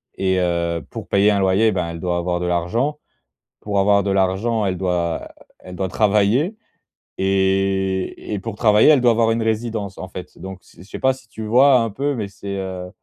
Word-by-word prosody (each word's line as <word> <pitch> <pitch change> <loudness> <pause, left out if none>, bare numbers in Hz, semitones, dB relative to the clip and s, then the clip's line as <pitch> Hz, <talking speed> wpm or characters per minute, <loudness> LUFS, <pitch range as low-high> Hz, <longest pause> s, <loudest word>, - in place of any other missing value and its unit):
Et 95 -1 0
heu, 85 -1 -1
pour - - -8
payer 100 +1 +3
un 100 - +1
loyer, 95 +4 +3
ben, 90 -4 -2
elle 85 -1 -7
doit 90 -1 -1
avoir 90 0 -2
de 90 - -2
l'argent. 115 - -1 0.6
Pour 100 -1 -2
avoir 100 +1 +4
de 100 - -2
l'argent, 100 +3 +1
elle 95 - -1
doit 90 -3 -2 0.3
elle 90 0 -10
doit 95 0 -1
travailler. 105 - +2 0.6
Et 95 0 0
et 105 - -2
pour 105 +1 -6
travailler, 105 +1 +5
elle 150 -4 +6
doit 120 -1 +5
avoir 115 0 +2
une 115 0 0
résidence, 110 -3 -2
en 95 - -7
fait. 90 -1 -10
Donc, 95 0 -8
je - - -25
sais 90 - -16
je 100 - -19
sais - - -7
pas 130 0 +3
si 130 -3 -16
tu 110 - -7
vois 130 +4 +5
un 115 - 0
peu, 140 +7 -2
mais 110 -4 -3
c'est, 100 0 -7
heu, 95 -1 -5
100 Hz, 210 wpm, -20 LUFS, 95-110 Hz, 0.6 s, elle